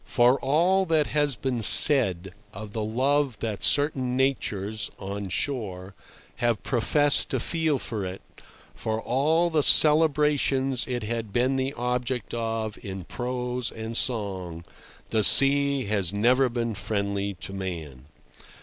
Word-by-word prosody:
For 125 +2 +2
all 180 +7 +1
that 160 -2 +1
has 145 -2 -1
been 120 +2 -3
said 95 - +5 0.2
of 110 -1 -9
the 110 0 -4
love 130 +3 -1
that 110 -3 -5
certain 130 -4 0
natures 110 -6 -2
(on 100 0 -7
shore) 95 -3 -4 0.4
have 120 -3 -1
professed 145 +4 +1
to 130 - -2
feel 160 +2 -1
for 110 -5 -5
it, 95 +1 -7 0.5
for 110 0 -4
all 155 +9 0
the 155 -2 +1
celebrations 150 -4 +3
it 125 -2 -4
had 115 -1 -5
been 125 +4 0
the 135 +1 -2
object 125 +1 -3
of 115 -2 -4
in 95 -2 -7
prose 125 +3 -4
and 110 +1 -7
song, 95 -9 -1 0.5
the 110 -1 +1
sea 140 +2 +6
has 100 -4 -1
never 125 +6 +2
been 115 -1 -3
friendly 100 -1 -3
to 90 +3 -9
man. 80 -9 -7
120 Hz, 135 wpm, -25 LUFS, 100-135 Hz, 0.5 s, sea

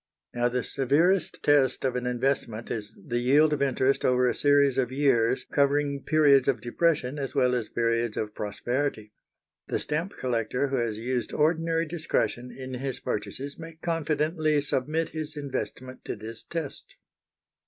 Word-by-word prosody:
Now, 120 0 +1
the 125 0 -1
severest 165 +7 +1
test 135 -3 +3
of 130 -1 0
an 125 0 -2
investment 125 -3 -1
is 105 -1 -5
the 120 0 -1
yield 145 +5 +4
of 150 - -2
interest 135 0 +2
over 125 0 +3
a - - +2
series 140 -2 +3
of 125 -1 0
years 130 -3 +2
covering 140 0 +1
periods 145 -4 +4
of 135 -3 +2
depression 145 +1 0
as 135 -2 -4
well 125 0 +3
as 120 -3 -1
periods 115 -1 0
of 105 -1 -3
prosperity. 110 +1 -3 0.5
The - - -1
stamp 160 +6 -2
collector 125 +2 -1
who 135 - 0
has 115 -3 -1
used 120 +1 -2
ordinary 165 +2 +1
discretion 155 -6 -1
in 130 -1 -8
his 135 -1 -4
purchases 140 +7 -4
may 165 0 -9
confidently 155 -1 0
submit 150 +3 -1
his 155 -1 -5
investment 130 -2 -5
to - - -3
this 110 +2 -8
test. 165 -4 -6
135 Hz, 155 wpm, -27 LUFS, 120-150 Hz, 0.5 s, yield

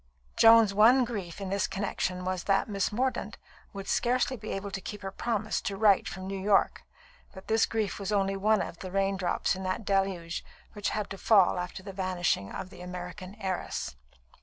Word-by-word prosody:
Joan's 225 -2 +7
one 240 +5 +6
grief 205 -7 -5
in 195 -1 -4
this 200 0 +1
connexion 185 -2 -2
was 185 -1 -2
that 195 -1 +2
Miss 200 -3 -1
Mordaunt 235 -2 -1 0.3
would 195 -1 -7
scarcely 250 +2 +1
be 215 -2 -8
able 195 +1 -4
to 190 - -4
keep 210 +2 -7
her 195 - -4
promise 215 0 -2
to 200 -2 -3
write 205 -2 +4
from 185 +1 -6
New 195 0 -4
York; 200 0 +2 0.5
but 190 - -11
this 220 0 +3
grief 215 -5 -2
was 200 0 -3
only 195 -1 +1
one 210 +2 +2
of 170 - -8
the 185 - -6
rain 195 +1 +1
drops 180 0 0
in 190 - -6
that 185 +3 -3
"deluge" 195 -4 -1 0.3
which 205 -1 -2
had 210 -2 -2
to 195 - -6
fall 195 -4 +4
after 180 +1 -5
the 195 0 -8
vanishing 180 - -1
of 185 - -6
the 175 - -12
American 180 +1 -7
heiress. 190 - -3
195 Hz, 195 wpm, -29 LUFS, 185-210 Hz, 0.5 s, Joan's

